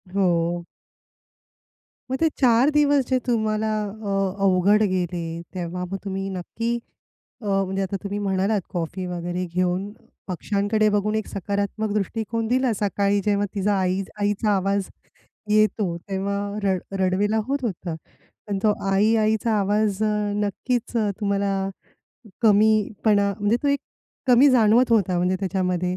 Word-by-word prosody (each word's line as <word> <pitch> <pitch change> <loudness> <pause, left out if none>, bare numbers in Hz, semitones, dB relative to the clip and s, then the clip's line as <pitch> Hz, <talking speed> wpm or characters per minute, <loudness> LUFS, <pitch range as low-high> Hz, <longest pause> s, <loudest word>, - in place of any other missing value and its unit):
हो. 175 -2 +1 1.5
मग 265 - 0
ते 325 - +4
4 250 +1 +5
दिवस 290 -3 +3
जे 260 - +2
तुम्हाला 220 -2 0
अ, 205 0 -6 0.3
अवघड 195 +3 +4
गेले. 175 -2 -1 0.3
तेव्हा 180 0 -4
मग 195 +2 -5
तुम्ही 195 0 -3
नक्की 220 +6 -4 0.7
अ, 215 - -9
म्हणजे 195 -1 0
आता 195 +1 -3
तुम्ही 200 +1 -3
म्हणालात 195 +1 0
कॉफी 180 +2 -3
वगैरे 175 +1 -3
घेऊन 185 +2 0 0.4
पक्षांकडे 205 +3 0
बघून 210 +1 0
एक 220 - -2
सकारात्मक 200 +2 -2
दृष्टिकोन 220 +2 -2
दिला. 255 +1 +2
सकाळी 200 0 +1
जेव्हा 205 -1 +2
तिचा 205 +1 +1
आई 185 +1 0 0.2
आईचा 205 +1 +1
आवाज 195 0 0 0.6
येतो 210 -4 +2
तेव्हा 195 +1 -1 0.3
रड 190 -2 +1 0.2
रडवेला 195 +4 +1
होत 280 +1 +1
होता 180 -6 -3 0.5
पण 200 -1 -1
तो 215 - +5 0.2
आई-आईचा 215 +2 +2
आवाज 205 0 +1 0.5
नक्कीच 240 +4 -2 0.3
तुम्हाला 200 -1 0 0.9
कमी 215 0 +5 0.3
पणा 200 -2 +3
म्हणजे 205 +3 +2
तो 285 - +1
एक 280 0 +1 0.5
कमी 260 +3 +6
जाणवत 235 0 +4
होता 195 -5 +3
म्हणजे 180 +1 +1
त्याच्यामध्ये. 180 -1 -1
200 Hz, 130 wpm, -23 LUFS, 190-220 Hz, 1.5 s, कमी